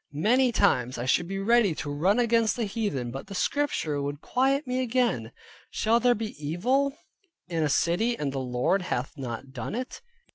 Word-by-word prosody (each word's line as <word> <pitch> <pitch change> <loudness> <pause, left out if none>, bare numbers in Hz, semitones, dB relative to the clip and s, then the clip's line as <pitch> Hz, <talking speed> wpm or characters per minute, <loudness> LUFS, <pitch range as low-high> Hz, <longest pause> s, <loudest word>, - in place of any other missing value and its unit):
Many 245 - +3
times 125 - +2
I 120 - -3
should 170 +6 +2
be 195 +1 -4
ready 205 -3 +3
to 145 - -4
run 180 +9 +2
against 230 -2 +2
the 240 - -2
heathen, 200 - -2
but 135 +7 -7
the 195 - -8
Scripture 180 - 0
would 145 0 -4
quiet 270 - +1
me 250 0 -1
again, 235 - 0 0.4
"Shall 225 +2 +2
there 245 0 +3
be 215 0 -4
evil 255 - 0 0.5
in 165 -2 -2
a 150 - +1
City 215 +11 +1
and 140 -2 -2
the 135 - -2
Lord 125 +9 0
hath 135 -7 -3
not 130 -1 -6
done 130 - -5
it?" 255 +2 -5
195 Hz, 185 wpm, -27 LUFS, 145-240 Hz, 0.5 s, Many